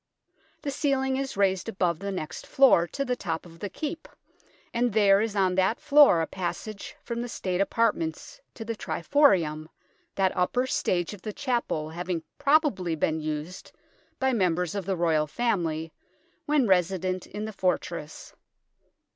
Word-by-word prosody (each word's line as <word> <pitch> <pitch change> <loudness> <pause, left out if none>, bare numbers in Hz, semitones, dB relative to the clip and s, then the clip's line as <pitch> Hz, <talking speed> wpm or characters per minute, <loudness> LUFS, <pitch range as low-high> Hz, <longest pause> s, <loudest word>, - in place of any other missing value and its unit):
The 285 - -2
ceiling 265 -2 0
is 270 -5 -4
raised 190 +1 +1
above 180 -6 0
the 200 +1 -4
next 170 -5 -6
floor 255 -11 +5
to 275 +8 -3
the 250 -1 0
top 165 -8 -4
of 165 -1 -14
the 205 - -4
Keep, 315 - -5 0.7
and 240 0 +1
there 200 -2 +5
is 220 -2 -2
on 190 -2 +2
that 190 +4 +1
floor 290 - +6
a - - 0
passage 190 +4 -5
from 235 -1 -4
the 245 - -5
State 185 -4 -2
apartments 195 -7 -1
to 225 - -7
the 230 0 -3
triforium, 170 - +2 0.5
that 190 -1 +1
upper 245 +8 +1
stage 180 -7 -1
of 200 - -11
the 215 - -5
chapel 235 - -2
having 175 0 -3 0.2
probably 275 - +2
been 160 +1 0
used 155 +3 -5 0.5
by 265 -1 +1
members 180 -5 +1
of 200 -3 -4
the 190 -2 0
Royal 160 -3 +2
family 165 -7 -1 0.5
when 295 -3 +3
resident 185 0 +1
in 210 +1 -5
the 220 - -6
fortress. 170 -4 -3
195 Hz, 155 wpm, -27 LUFS, 170-240 Hz, 0.7 s, floor